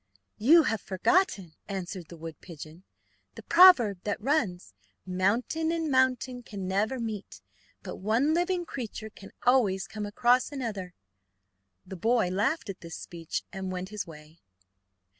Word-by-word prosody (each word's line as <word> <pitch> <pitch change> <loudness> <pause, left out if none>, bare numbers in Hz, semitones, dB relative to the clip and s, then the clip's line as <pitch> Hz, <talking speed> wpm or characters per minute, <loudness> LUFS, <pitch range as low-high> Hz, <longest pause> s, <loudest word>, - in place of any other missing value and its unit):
"You 315 +10 +7
have 225 -7 -1
forgotten," 195 - +1
answered 185 -3 -5
the 170 - -10
wood 165 0 -9
pigeon, 160 -1 -11 0.5
"the - - -10
proverb 335 - +7
that 205 - -2
runs, 210 - -1 0.3
'mountain 220 - 0
and 325 -3 -1
mountain 255 -1 +1
can 200 -5 -7
never 210 +7 0
meet, 220 -3 -5 0.4
but - - -7
one 230 +10 +1
living 350 +1 0
creature 225 -6 -6
can 195 -1 -13
always 220 -7 +3
come 210 -1 -5
across 245 +6 +2
another.'" 210 -10 -5 0.9
The 190 - -8
boy 225 0 +2
laughed 225 - 0
at 195 -2 -6
this 170 -1 -8
speech 165 -2 -5
and 190 -1 -4
went 185 +1 -5
his 210 -2 -5
way. 155 0 -14
210 Hz, 140 wpm, -28 LUFS, 185-260 Hz, 0.9 s, You